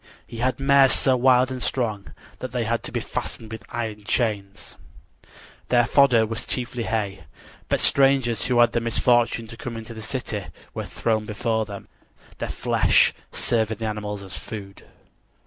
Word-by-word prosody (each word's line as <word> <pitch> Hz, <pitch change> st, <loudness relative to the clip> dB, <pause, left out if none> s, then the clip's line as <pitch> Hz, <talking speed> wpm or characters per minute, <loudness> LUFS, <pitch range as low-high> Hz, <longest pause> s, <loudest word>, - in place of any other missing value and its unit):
He 115 Hz, -, -10 dB
had 125 Hz, +2 st, 0 dB
mares 135 Hz, -1 st, +5 dB
so 130 Hz, -2 st, +4 dB
wild 130 Hz, 0 st, +4 dB
and 130 Hz, -1 st, -5 dB
strong 110 Hz, -7 st, -2 dB, 0.2 s
that 130 Hz, -, -5 dB
they 125 Hz, -2 st, -1 dB
had 115 Hz, +1 st, -1 dB
to -, -, -6 dB
be -, -, -2 dB
fastened 110 Hz, -1 st, -5 dB
with 110 Hz, 0 st, -6 dB
iron 110 Hz, -3 st, -4 dB
chains. 105 Hz, -3 st, -2 dB, 0.9 s
Their 120 Hz, -1 st, +4 dB
fodder 125 Hz, -4 st, +5 dB
was 115 Hz, +2 st, -5 dB
chiefly 120 Hz, -2 st, -3 dB
hay; 100 Hz, -3 st, -2 dB, 0.4 s
but -, -, +2 dB
strangers 135 Hz, -4 st, +3 dB
who 125 Hz, -1 st, +1 dB
had 120 Hz, -, +6 dB
the 120 Hz, -, 0 dB
misfortune 115 Hz, 0 st, +2 dB
to 115 Hz, +1 st, -11 dB
come 115 Hz, 0 st, -6 dB
into 115 Hz, +1 st, -8 dB
the 110 Hz, -, -8 dB
city 110 Hz, -4 st, -4 dB, 0.3 s
were -, -, -4 dB
thrown 110 Hz, -2 st, -1 dB
before 110 Hz, +1 st, -1 dB
them, 100 Hz, -1 st, -9 dB, 0.5 s
their -, -, -3 dB
flesh -, -, +3 dB, 0.2 s
serving 110 Hz, -2 st, 0 dB
the 115 Hz, -, -4 dB
animals 105 Hz, -1 st, -4 dB
as 95 Hz, -1 st, -8 dB
food. 100 Hz, -3 st, -8 dB
115 Hz, 165 wpm, -24 LUFS, 110-125 Hz, 0.9 s, had